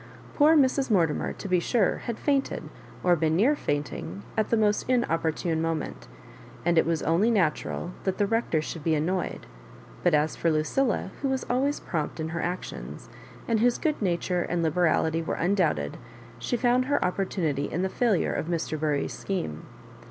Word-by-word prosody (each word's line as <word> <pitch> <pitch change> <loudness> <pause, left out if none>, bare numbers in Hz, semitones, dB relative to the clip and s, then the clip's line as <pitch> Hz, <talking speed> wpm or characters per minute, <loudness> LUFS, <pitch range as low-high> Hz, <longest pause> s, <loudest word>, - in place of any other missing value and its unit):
Poor 310 +2 +5
Mrs. 270 -1 +3
Morti 170 -8 +3
mer, - - -3
to - - -7
be 180 -1 +3
sure, 200 +2 +1
had 235 -2 -5
fainted, 280 -2 0 0.4
or 180 -1 +5
been 160 -1 +1
near 245 - +4
faint 145 - -2
ing, 90 +6 -7
at 220 -1 0
the 230 - +3
most 210 +2 +1
inopportune 165 -8 +1
moment, 165 -2 -3 0.6
and 170 -1 +4
it - - +2
was 165 -2 0
only 170 +8 +3
natural 175 -3 0
that 190 -1 -1
the 205 - +2
Rector 200 -7 0
should 155 -1 -6
be 160 0 +2
annoyed; 175 +5 -2 0.6
but 175 -3 +3
as 150 +1 +1
for 170 - +1
Lucilla, 190 - 0
who 275 - 0
was 265 -1 -1
always 275 +4 +1
prompt 155 -1 -3
in 160 0 -2
her 165 0 -3
actions, 180 +1 -5 0.4
and 230 -2 +2
whose 240 +2 +3
good 305 -5 -1
nature 180 -1 0
and 175 0 -1
liberality 160 0 +2
were 160 - -2
undoubted, 170 - 0 0.4
she 245 - -1
found 245 +1 +2
her 285 -5 +1
opportunity 180 -6 -1
in 180 - -1
the - - +2
failure 210 -1 +1
of - - -2
Mr. 165 -2 -2
Bury*s 150 -2 0
scheme. 80 - -4
175 Hz, 180 wpm, -27 LUFS, 160-225 Hz, 0.6 s, Poor